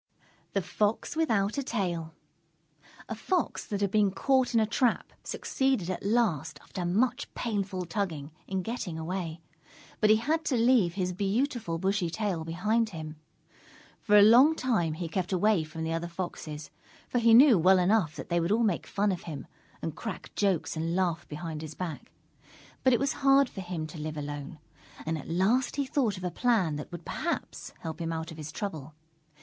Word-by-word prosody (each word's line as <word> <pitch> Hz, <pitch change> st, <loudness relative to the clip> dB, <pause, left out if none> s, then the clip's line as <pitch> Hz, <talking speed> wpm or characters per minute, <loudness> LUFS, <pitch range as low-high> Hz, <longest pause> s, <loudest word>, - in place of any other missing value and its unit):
_ -, -, -41 dB
THE 195 Hz, -, 0 dB
FOX 210 Hz, -, -1 dB
WITHOUT 225 Hz, -7 st, +1 dB
A -, -, +1 dB
TAIL 175 Hz, -, -2 dB, 0.9 s
A -, -, -3 dB
Fox 340 Hz, -, -1 dB
that 205 Hz, -1 st, -3 dB
had 200 Hz, -2 st, +1 dB
been 210 Hz, -1 st, +4 dB
caught 260 Hz, +5 st, +1 dB
in -, -, +6 dB
a 220 Hz, -, +3 dB
trap, 235 Hz, +2 st, 0 dB
succeeded 265 Hz, -10 st, 0 dB
at 185 Hz, -, -4 dB
last, 180 Hz, -, +1 dB
after 180 Hz, -, -5 dB
much 240 Hz, +8 st, +1 dB
painful 200 Hz, -5 st, -2 dB
tugging, 165 Hz, -5 st, -3 dB, 0.2 s
in 190 Hz, -1 st, -2 dB
getting 225 Hz, -7 st, -4 dB
away. 165 Hz, 0 st, -4 dB, 0.6 s
But 215 Hz, -, +4 dB
he 215 Hz, -, +8 dB
had 310 Hz, +9 st, 0 dB
to 260 Hz, -, +1 dB
leave 230 Hz, -7 st, +4 dB
his 180 Hz, -2 st, -1 dB
beautiful 205 Hz, -, -1 dB
bushy 190 Hz, 0 st, 0 dB
tail 185 Hz, -2 st, -2 dB
behind 210 Hz, +8 st, 0 dB
him. 155 Hz, -4 st, -7 dB, 0.8 s
For 210 Hz, -1 st, +5 dB
a 205 Hz, -, +9 dB
long 250 Hz, +9 st, +7 dB
time 220 Hz, -, 0 dB
he 170 Hz, +2 st, -4 dB
kept 180 Hz, +3 st, -2 dB
away 190 Hz, -1 st, +3 dB
from 155 Hz, +1 st, -6 dB
the 160 Hz, 0 st, -1 dB
other 165 Hz, +1 st, -2 dB
Foxes, 165 Hz, -4 st, -6 dB, 0.4 s
for 245 Hz, -, 0 dB
he 230 Hz, -1 st, +6 dB
knew 250 Hz, -, +8 dB
well 185 Hz, +3 st, +6 dB
enough 180 Hz, -4 st, +2 dB
that -, -, -8 dB
they 170 Hz, 0 st, +2 dB
would 170 Hz, +3 st, 0 dB
all 230 Hz, +2 st, +3 dB
make 200 Hz, -7 st, 0 dB
fun 205 Hz, 0 st, +1 dB
of 180 Hz, -, -5 dB
him 150 Hz, -3 st, -6 dB, 0.4 s
and 160 Hz, -2 st, -3 dB
crack 220 Hz, +1 st, -6 dB
jokes 195 Hz, -6 st, 0 dB
and 165 Hz, +2 st, -1 dB
laugh 175 Hz, -3 st, 0 dB
behind 155 Hz, 0 st, -5 dB
his 155 Hz, -1 st, -7 dB
back. 170 Hz, -5 st, -6 dB, 0.7 s
But 260 Hz, -, +5 dB
it 240 Hz, -, +3 dB
was 275 Hz, 0 st, +1 dB
hard 275 Hz, 0 st, +6 dB
for 195 Hz, -, -7 dB
him 175 Hz, -3 st, -4 dB
to 155 Hz, +1 st, -9 dB
live 155 Hz, 0 st, -4 dB
alone, 145 Hz, 0 st, -5 dB, 0.5 s
and 160 Hz, +1 st, -1 dB
at 155 Hz, -, -7 dB
last 205 Hz, +10 st, +2 dB
he 280 Hz, 0 st, 0 dB
thought 255 Hz, -7 st, 0 dB
of 185 Hz, -, -8 dB
a 180 Hz, -, -1 dB
plan 195 Hz, -12 st, +1 dB
that 150 Hz, -, -7 dB
would 175 Hz, -1 st, -8 dB
perhaps 340 Hz, +2 st, -3 dB
help 160 Hz, 0 st, -5 dB
him 165 Hz, 0 st, -2 dB
out 160 Hz, +1 st, -4 dB
of 160 Hz, -, -10 dB
his 155 Hz, -1 st, -6 dB
trouble. 155 Hz, -5 st, -5 dB
190 Hz, 190 wpm, -29 LUFS, 165-225 Hz, 0.9 s, a